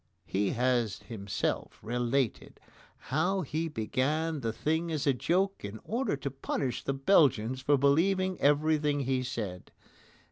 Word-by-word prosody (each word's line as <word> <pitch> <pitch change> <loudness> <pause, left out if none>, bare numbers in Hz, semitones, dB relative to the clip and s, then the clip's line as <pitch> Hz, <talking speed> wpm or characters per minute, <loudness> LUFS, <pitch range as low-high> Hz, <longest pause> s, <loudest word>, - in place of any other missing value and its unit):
He 100 0 0
has 120 -4 +1
himself 100 -4 -3
related 120 +1 -1 0.4
how 175 +8 0
he 160 +1 -2
began 150 +5 -1
the 115 -4 -2
thing 160 +7 -1
as 155 -3 -1
a 140 - +4
joke 185 +9 0
in 100 +2 -6
order 235 - -1
to 140 0 -4
punish 135 -1 -3
the 135 - -1
Belgians 130 - +3
for 145 +2 +3
believing 185 +7 +2
everything 150 0 +3
he 130 -1 0
said. 105 -8 -5
140 Hz, 135 wpm, -30 LUFS, 120-160 Hz, 0.4 s, a